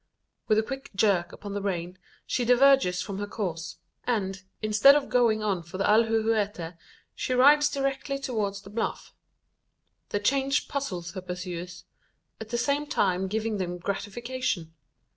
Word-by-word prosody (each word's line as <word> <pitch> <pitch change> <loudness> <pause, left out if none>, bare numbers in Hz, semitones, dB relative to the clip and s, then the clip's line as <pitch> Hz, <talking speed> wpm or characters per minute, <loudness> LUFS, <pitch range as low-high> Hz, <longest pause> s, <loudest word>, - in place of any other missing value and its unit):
With 215 - +3
a 220 - +3
quick 270 +4 -6
jerk 195 -4 +2
upon 205 -1 -8
the 205 - -2
rein, 180 -1 -3 0.3
she 250 - -1
diverges 250 -6 +4
from 195 -1 -5
her 205 - -3
course; 175 -6 -4 0.3
and, 195 -5 -1 0.2
instead 215 +6 +6
of 290 -2 0
going 230 -4 +3
on 195 -4 0
for 170 +3 -9
the 195 - 0
alhuehuete, 215 -5 +2 0.4
she 255 - -2
rides 290 +3 +6
directly 275 0 -2
towards 210 -7 -3
the 200 - -12
bluff. 225 +2 -3 1.0
The 205 - -1
change 275 +6 +1
puzzles 185 -12 -4
her 190 - -6
pursuers 180 0 -6 0.5
at 220 - -8
the 240 - -1
same 285 +4 0
time 190 -6 +1
giving 220 +2 -1
them 180 -1 -3
gratification. 205 -1 -3
210 Hz, 150 wpm, -27 LUFS, 185-250 Hz, 1.0 s, instead